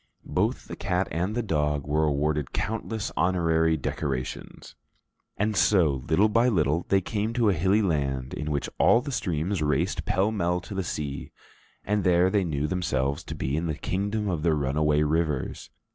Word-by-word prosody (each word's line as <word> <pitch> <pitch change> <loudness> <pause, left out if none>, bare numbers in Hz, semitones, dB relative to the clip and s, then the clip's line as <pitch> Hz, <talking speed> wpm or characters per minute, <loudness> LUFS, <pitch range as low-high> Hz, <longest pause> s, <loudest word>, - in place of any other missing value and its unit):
Both - - -1
the - - -6
cat 90 0 -1
and 90 +6 -1
the 120 - 0
dog 75 -6 0
were 75 +2 +1
awarded 75 -1 0
countless 110 0 -3
honorary 80 -3 +2
decorations. 65 -2 -4 0.6
And 105 +1 0
so, 85 -7 +3
little 105 +3 +4
by 115 +3 +3
little, 85 - +1
they 95 -1 +4
came 105 +4 -2
to 115 -3 +2
a - - +3
hilly 95 +6 +2
land 70 -7 -1
in 75 - -4
which 70 -2 -1
all 115 - +5
the 140 - -5
streams 90 - -1
raced 75 +6 0
pell 100 +4 +1
mell 90 -4 0
to 100 - -9
the 95 -1 -2
sea, 75 -4 -4 0.5
and 105 0 0
there 90 +1 +4
they 100 -1 +2
knew 75 -4 -1
themselves 70 -5 -1
to - - -6
be 65 +2 -2
in 85 +2 -1
the 80 - -1
Kingdom 100 +6 -2
of 85 -5 -1
the 80 -1 +2
Runaway 75 +1 +1
Rivers. 75 -3 -1
85 Hz, 175 wpm, -26 LUFS, 75-100 Hz, 0.6 s, all